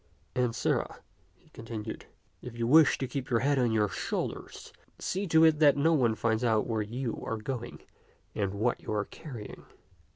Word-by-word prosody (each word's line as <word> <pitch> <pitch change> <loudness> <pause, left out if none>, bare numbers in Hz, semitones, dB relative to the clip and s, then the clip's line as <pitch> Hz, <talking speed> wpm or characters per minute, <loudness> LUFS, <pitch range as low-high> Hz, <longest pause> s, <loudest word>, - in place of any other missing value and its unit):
And, 125 -2 0
sirrah," - - -1 0.3
he 125 - -27
continued, 115 -2 -7 0.2
" - - -40
if 120 -1 -9
you 115 - -1
wish 150 +5 +6
to 130 - -3
keep 135 0 -5
your 115 -3 +2
head 140 +1 +2
on 120 -2 +2
your 105 -2 +2
shoulders, - - -5 0.2
see 195 +2 -2
to 160 -1 +5
it 160 -2 +5
that 145 -3 +6
no 160 +4 +3
one 120 -7 +2
finds 115 +1 0
out 110 -3 +2
where 110 -2 -1
you 115 +3 -4
are 115 - -3
going 120 +2 -6 0.5
or 100 - 0
what 105 +5 -1
you - - -6
are 105 -1 0
carrying." 120 -10 -9
120 Hz, 190 wpm, -29 LUFS, 110-140 Hz, 0.5 s, wish